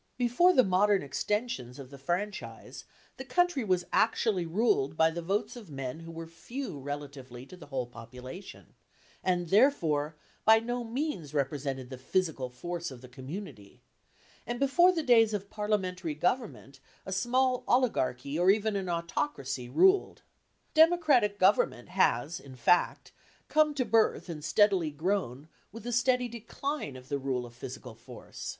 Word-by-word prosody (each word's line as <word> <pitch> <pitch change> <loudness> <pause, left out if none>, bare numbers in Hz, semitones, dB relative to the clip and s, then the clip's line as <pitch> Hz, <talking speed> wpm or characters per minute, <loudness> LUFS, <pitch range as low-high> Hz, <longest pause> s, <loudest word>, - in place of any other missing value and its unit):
Before 250 +9 +4
the 260 -7 +5
modern 195 0 +3
extensions 140 - -3
of 135 -2 -10
the 140 - -10
franchise, 180 +9 -4 0.3
the 265 - -6
country 350 +1 +1
was 185 -4 +1
actually 215 -5 +2
ruled 160 - +1
by 160 0 +4
the 170 +1 -4
votes 205 +7 -2
of 225 -7 -11
men 135 0 -5
who 165 0 -9
were 165 0 -7
few 170 - -7
relatively 135 -3 -7
to 185 - -12
the 180 - -13
whole 130 -3 -2
population, 125 - -11 0.5
and, 175 -2 0
therefore, 165 - +3 0.3
by 220 +1 +7
no 240 +2 -2
means 230 - -4
represented 135 -2 -2
the 130 - -7
physical 150 -3 -1
force 170 +7 -5
of 130 -2 -11
the 130 - -11
community, 130 - -9 0.6
and 240 0 -3
before 345 +7 +5
the 330 -3 -2
days 225 -5 +5
of 200 0 -6
parliamentary 190 -6 -2
government 175 - -2 0.3
a - - -6
small 250 +6 +1
oligarchy 145 - +1
or 180 +2 +4
even 215 +1 +2
an 190 -2 -2
autocracy 170 - -3
ruled. 380 - +3 0.5
Democratic 310 -10 +4
government 185 -9 +2
has, 165 -4 +1
in 135 -2 -12
fact, 130 +8 +2 0.4
come 305 -1 +3
to 260 -3 0
birth 225 -5 +2
and 155 -3 -6
steadily 190 0 +3
grown 155 -4 -2 0.2
with 225 +1 -10
the 240 - -4
steady 250 +1 +2
decline 235 - -5
of 130 0 -12
the 140 0 -2
rule 130 -2 -2
of 120 - -12
physical 125 0 -8
force. 120 +2 -10
180 Hz, 155 wpm, -30 LUFS, 140-230 Hz, 0.6 s, by